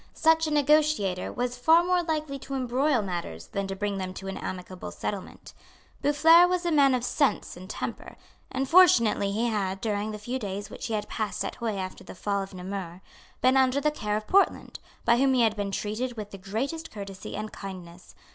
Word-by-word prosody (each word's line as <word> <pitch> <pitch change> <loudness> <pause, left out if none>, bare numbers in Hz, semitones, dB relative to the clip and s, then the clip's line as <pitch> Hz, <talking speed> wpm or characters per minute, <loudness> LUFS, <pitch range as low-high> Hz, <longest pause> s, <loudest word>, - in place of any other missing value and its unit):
Such 320 0 +3
a - - -2
negotiator 295 -10 +2
was 245 0 -3
far 325 +6 +5
more 360 0 +2
likely 310 -4 -3
to 275 +1 -6
embroil 255 0 +1
matters 170 - -5
than 195 - -3
to 195 - -4
bring 200 0 -2
them 185 0 -5
to 195 - -7
an 195 - -4
amicable 185 0 -6
settlement. 200 -2 -6 0.5
Boufflers 325 +4 +6
was 360 -1 0
a 345 - +1
man 280 -4 +5
of 245 - -2
sense 270 +2 0
and 185 +2 -11
temper; - - -5 0.4
and 265 +1 -1
fortunately 245 - +5
he 220 +4 0
had, 195 -4 -1
during 210 0 -2
the 215 - -5
few 240 +5 -4
days 205 -1 -5
which - - -6
he 225 - -1
had 210 0 -3
passed 215 -2 -3
at - - -5
Huy 225 -3 -2
after 185 -1 -5
the - - -10
fall 200 +1 -1
of 195 - -7
Namur, 185 -1 -6 0.4
been 255 +1 +4
under 265 +1 +4
the 300 +1 +1
care 210 -7 -2
of 215 - -6
Portland, 395 - +2 0.3
by 235 0 +5
whom 265 +1 +3
he 250 - +3
had 220 -1 +2
been 205 -1 -2
treated 220 +5 -3
with 210 -1 -6
the 195 - -9
greatest 265 - -3
courtesy 195 -2 -8
and 215 +1 -5
kindness. 180 -3 -9
220 Hz, 205 wpm, -27 LUFS, 195-275 Hz, 0.5 s, Boufflers